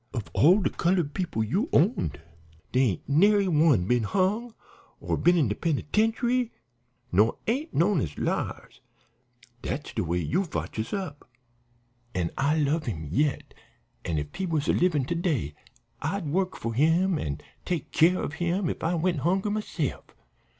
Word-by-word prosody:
Of 115 Hz, -5 st, -4 dB
all 180 Hz, +8 st, +5 dB
de -, -, +1 dB
colored 170 Hz, -4 st, 0 dB
people 170 Hz, -, -1 dB
you 195 Hz, -, -1 dB
owned, 170 Hz, -, +2 dB, 0.5 s
dere 130 Hz, -, +3 dB
ain't -, -, -11 dB
nary 200 Hz, +7 st, +4 dB
one 150 Hz, -, +4 dB
been 125 Hz, +4 st, +2 dB
hung, 200 Hz, -, 0 dB, 0.4 s
or -, -, -1 dB
been 175 Hz, +1 st, +3 dB
in 150 Hz, -7 st, +3 dB
de 105 Hz, -, 0 dB
penitentiary, 225 Hz, -, 0 dB, 0.6 s
nor 105 Hz, +5 st, +3 dB
ain't 275 Hz, +8 st, -1 dB
knowed 170 Hz, 0 st, +3 dB
as 75 Hz, -8 st, -4 dB
liars. -, -, -3 dB, 0.8 s
Dat's 145 Hz, -, -4 dB
de -, -, -1 dB
way 85 Hz, +1 st, -1 dB
you 140 Hz, -, 0 dB
fotch 160 Hz, -, -5 dB
us 110 Hz, -, -3 dB
up.' 180 Hz, -10 st, -5 dB, 0.9 s
"An' 90 Hz, -2 st, -1 dB
I 145 Hz, +3 st, +1 dB
love 155 Hz, +1 st, 0 dB
him 80 Hz, -9 st, -4 dB
yet, 145 Hz, -, 0 dB, 0.5 s
an' 80 Hz, -, -2 dB
if 75 Hz, 0 st, -4 dB
he 190 Hz, -, -3 dB
was 155 Hz, -3 st, -1 dB
a -, -, +3 dB
livin' 155 Hz, -7 st, +2 dB
to 170 Hz, -, -2 dB
day 155 Hz, -, -1 dB, 0.5 s
I'd 200 Hz, -3 st, -2 dB
work 185 Hz, +5 st, -1 dB
for 115 Hz, 0 st, -3 dB
him 165 Hz, +7 st, +3 dB
an' 70 Hz, -2 st, -3 dB, 0.2 s
take 175 Hz, -4 st, -3 dB
care 175 Hz, +3 st, +3 dB
of -, -, -4 dB
him 175 Hz, +1 st, 0 dB
if -, -, -7 dB
I 165 Hz, +2 st, +1 dB
went 170 Hz, -1 st, 0 dB
hungry 190 Hz, +7 st, +1 dB
myse'f. 205 Hz, -8 st, -3 dB
165 Hz, 165 wpm, -27 LUFS, 130-190 Hz, 0.9 s, all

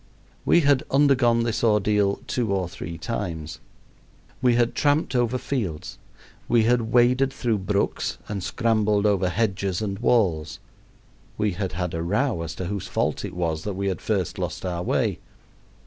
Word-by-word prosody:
We 170 Hz, -, +5 dB
had 140 Hz, -3 st, +4 dB
undergone 130 Hz, -4 st, +4 dB
this 115 Hz, -1 st, -1 dB
ordeal 105 Hz, -2 st, +2 dB
two 120 Hz, -5 st, -1 dB
or 95 Hz, -2 st, 0 dB
three 85 Hz, -1 st, -7 dB
times. 85 Hz, -9 st, -4 dB, 0.8 s
We 125 Hz, -2 st, +4 dB
had 120 Hz, -1 st, +2 dB
tramped 145 Hz, -1 st, +1 dB
over 120 Hz, 0 st, +1 dB
fields. 105 Hz, -, -4 dB, 0.5 s
We 115 Hz, -2 st, +4 dB
had 115 Hz, -1 st, +1 dB
waded 125 Hz, +2 st, +4 dB
through 120 Hz, -5 st, -1 dB
brooks 100 Hz, +1 st, -1 dB
and 105 Hz, -2 st, -4 dB
scrambled 105 Hz, 0 st, +1 dB
over 100 Hz, -3 st, +2 dB
hedges 95 Hz, -1 st, -1 dB
and 100 Hz, -2 st, -3 dB
walls. 95 Hz, -11 st, +1 dB, 0.8 s
We 105 Hz, -1 st, +1 dB
had 95 Hz, -1 st, -3 dB
had 90 Hz, 0 st, -3 dB
a 80 Hz, -, -2 dB
row 105 Hz, +3 st, 0 dB
as 85 Hz, -2 st, -5 dB
to 90 Hz, -, -4 dB
whose 100 Hz, +1 st, -4 dB
fault -, -, -1 dB
it -, -, -6 dB
was 80 Hz, -3 st, -1 dB
that 105 Hz, -2 st, -3 dB
we 100 Hz, +1 st, -1 dB
had 95 Hz, -, -4 dB
first -, -, -1 dB
lost -, -, -4 dB
our 90 Hz, -2 st, -2 dB
way. -, -, 0 dB
105 Hz, 165 wpm, -24 LUFS, 90-120 Hz, 0.8 s, We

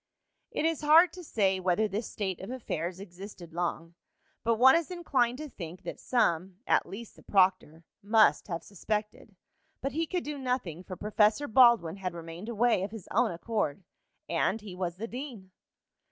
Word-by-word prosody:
It -, -, -2 dB
is 325 Hz, -2 st, 0 dB
hard 320 Hz, +3 st, +6 dB
to 360 Hz, -, -9 dB
say 195 Hz, -, +1 dB
whether 185 Hz, +4 st, +2 dB
this 210 Hz, +2 st, -4 dB
state 190 Hz, -4 st, -3 dB
of 190 Hz, -, -7 dB
affairs 185 Hz, -8 st, -4 dB
existed 185 Hz, -2 st, -10 dB
long, 170 Hz, -1 st, -3 dB, 0.5 s
but 230 Hz, 0 st, +2 dB
one 260 Hz, +5 st, +7 dB
is 335 Hz, -1 st, 0 dB
inclined 265 Hz, -9 st, 0 dB
to 305 Hz, +1 st, -6 dB
think 180 Hz, -, -9 dB
that 175 Hz, -, -6 dB
some, 185 Hz, -6 st, +1 dB
at -, -, +2 dB
least 220 Hz, +3 st, -9 dB
the -, -, -17 dB
proctor, 185 Hz, -4 st, +2 dB, 0.2 s
must 215 Hz, +2 st, +4 dB
have 170 Hz, -4 st, -4 dB
suspected. 210 Hz, +1 st, -4 dB, 0.4 s
But 275 Hz, -, -2 dB
he 325 Hz, +4 st, -1 dB
could 360 Hz, 0 st, -2 dB
do 295 Hz, -1 st, -5 dB
nothing, 250 Hz, -, -2 dB
for 185 Hz, -, -7 dB
Professor 215 Hz, +7 st, +2 dB
Baldwin 225 Hz, -8 st, +5 dB
had 185 Hz, -3 st, -4 dB
remained 170 Hz, +5 st, -8 dB
away 235 Hz, -2 st, +2 dB
of 195 Hz, -, -2 dB
his 215 Hz, -3 st, -10 dB
own 235 Hz, +3 st, +3 dB
accord. 190 Hz, -2 st, -2 dB, 0.4 s
And 225 Hz, -, 0 dB
he 210 Hz, -3 st, -9 dB
was 180 Hz, -2 st, -3 dB
the 220 Hz, +5 st, -5 dB
dean. 235 Hz, -7 st, -8 dB
210 Hz, 175 wpm, -29 LUFS, 180-245 Hz, 0.5 s, one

